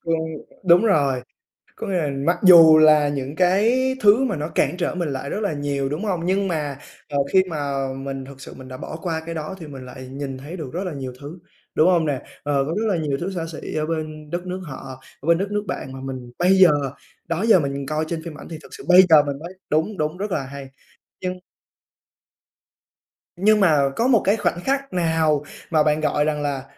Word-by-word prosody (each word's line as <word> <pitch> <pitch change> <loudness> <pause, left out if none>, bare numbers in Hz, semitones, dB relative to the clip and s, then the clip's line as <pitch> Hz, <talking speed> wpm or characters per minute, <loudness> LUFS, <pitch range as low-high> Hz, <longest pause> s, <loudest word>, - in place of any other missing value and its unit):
Ừm, 165 -1 +1 0.5
đúng 175 +3 +6
rồi. 140 - +2 0.5
Có - - -6
nghĩa 195 - -2
là 155 -4 0 0.2
mặc 170 +1 +2
dù 165 -4 +9
là 155 -2 +6
những 140 0 -4
cái 220 +9 +2
thứ 215 +5 +5
mà 245 -6 0
nó 150 +1 -4
cản 180 - 0
trở 175 0 -2
mình 175 -4 -2
lại 140 0 -4
rất 205 - -3
là 200 -7 -1
nhiều, 140 -1 -2
đúng 155 +8 -4
hông? 180 -5 -2
Nhưng 195 +2 +1
mà, 150 -6 -2 0.3
ờ, 145 - -2 0.2
khi 190 - +6
mà 140 -4 -2
mình 135 0 -6
thực 135 0 -12
sự - - -10
mình 130 - -12
đã 130 0 -8
bỏ - - -7
qua 165 -3 -2
cái 165 0 -5
đó 155 +4 -5
thì 160 - -9
mình 135 -3 -9
lại 130 0 -10
nhìn 135 0 -6
thấy 145 +7 -8
được 155 -6 -6
rất 180 +3 -2
là 180 -4 -4
nhiều 130 -3 -6
thứ, 150 +5 -9 0.4
đúng 160 - +5
hông 170 -3 +3
nè? 140 -4 -1 0.2
Ờ, 140 -1 +1
có 160 - -2
rất 225 - -1
là 195 -4 +1
nhiều 150 -4 -1
thứ 185 +3 -2
xa 175 -3 -3
xỉ 155 - -7
ở 155 0 0
bên 155 -1 -5
đất 175 +3 -4
nước 185 +1 -4
họ, 130 -2 -9 0.2
ở 145 - -9
bên 170 0 +5
đất 195 +3 -3
nước 205 0 -1
bạn 130 - -5
mà 135 - -8
mình 130 -2 -7
bây 180 +2 +4
giờ, 185 -2 +8 0.6
đó 170 +4 -1
giờ 225 -5 +6
mình 140 -2 -3
coi 155 +3 -1
trên 165 0 -4
phim 165 -2 -8
ảnh - - -11
thì 165 - -6
thực - - -15
sự - - -10
bây 180 +1 +9
giờ 155 -2 +7
mình 140 -1 -4
mới 170 +4 -8 0.2
đúng, 160 +7 0
đúng, 155 +2 -2
rất 205 +2 -4
là 150 - -1
hay, 140 +1 -8 0.5
nhưng 185 0 -3 2.0
nhưng 210 +3 +4
mà 150 -7 +4
có 235 - +1
một 240 -5 +4
cái 200 - +4
khoảnh 175 -4 -1
khắc 275 -2 -1
nào 160 -4 +1 0.3
mà 155 -2 +3
bạn 150 0 +1
gọi 150 -1 +1
rằng 150 -1 -1
là 140 -2 -2
155 Hz, 235 wpm, -22 LUFS, 140-180 Hz, 2.0 s, dù